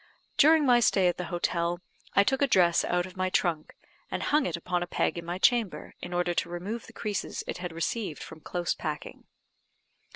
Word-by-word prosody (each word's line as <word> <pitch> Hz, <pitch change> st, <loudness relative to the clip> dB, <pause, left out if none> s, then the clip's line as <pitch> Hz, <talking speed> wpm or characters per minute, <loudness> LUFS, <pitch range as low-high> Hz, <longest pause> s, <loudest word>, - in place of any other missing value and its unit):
During 310 Hz, 0 st, +6 dB
my 245 Hz, -2 st, +6 dB
stay 195 Hz, -5 st, +3 dB
at 175 Hz, -, 0 dB
the 180 Hz, -, -3 dB
hotel, 175 Hz, 0 st, -1 dB, 0.4 s
I 200 Hz, -, +7 dB
took 265 Hz, +6 st, 0 dB
a 280 Hz, -, +4 dB
dress 175 Hz, -7 st, +4 dB
out 175 Hz, 0 st, 0 dB
of 185 Hz, -, -11 dB
my 185 Hz, 0 st, 0 dB
trunk, 165 Hz, -4 st, -1 dB, 0.3 s
and -, -, -3 dB
hung 295 Hz, -1 st, +2 dB
it -, -, -2 dB
up 170 Hz, -, -14 dB
upon 180 Hz, -1 st, 0 dB
a 175 Hz, -, -2 dB
peg -, -, 0 dB
in 170 Hz, -, -5 dB
my 175 Hz, +1 st, -3 dB
chamber, 225 Hz, 0 st, +1 dB
in 175 Hz, -, -7 dB
order 175 Hz, 0 st, 0 dB
to -, -, -1 dB
remove 190 Hz, +7 st, -5 dB
the -, -, -12 dB
creases 210 Hz, -3 st, -3 dB
it -, -, -5 dB
had 180 Hz, -1 st, -4 dB
received 165 Hz, +1 st, -3 dB
from 160 Hz, -, -10 dB
close 175 Hz, +2 st, -2 dB
packing. 150 Hz, -1 st, -6 dB
180 Hz, 215 wpm, -28 LUFS, 175-215 Hz, 0.4 s, I